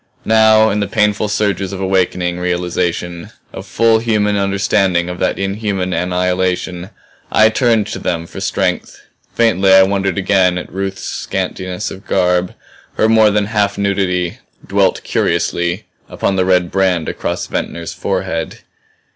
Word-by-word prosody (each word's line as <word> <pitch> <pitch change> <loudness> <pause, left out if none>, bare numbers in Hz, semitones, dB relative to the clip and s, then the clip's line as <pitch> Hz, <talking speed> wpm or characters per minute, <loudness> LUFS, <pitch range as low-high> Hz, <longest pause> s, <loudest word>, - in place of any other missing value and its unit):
Now 110 0 +5
in 105 - 0
the 100 - -1
painful 105 0 +1
surges 100 -2 -1
of 95 - -6
awakening 90 -2 0
realization, 90 -1 -2 0.2
of - - -8
full 115 -1 +3
human 105 -3 +1
understanding 100 -3 +1
of 90 - -6
that - - 0
inhuman 100 -2 -2
annihilation, 90 +1 -1 0.4
I 110 0 +5
turned 115 -2 +2
to - - -5
them 85 -2 -2
for - - -9
strength. - - -2 0.4
Faintly 100 -5 +3
I 95 0 +8
wondered 100 0 0
again 95 -2 +2
at 90 - -7
Ruth's 95 0 -4
scantiness 95 +2 -4
of 95 +2 -11
garb, 90 -1 +1 0.4
her 110 - +2
more 110 -1 +5
than 105 0 +1
half 105 -1 0
nudity; 95 -3 -1 0.3
dwelt - - +1
curiously 85 +3 -1 0.2
upon 95 - -1
the 95 -1 +1
red 90 -2 +2
brand 90 -4 +1
across - - -3
Ventnor's 85 -1 -4
forehead. 80 0 -3
95 Hz, 140 wpm, -16 LUFS, 90-105 Hz, 0.4 s, I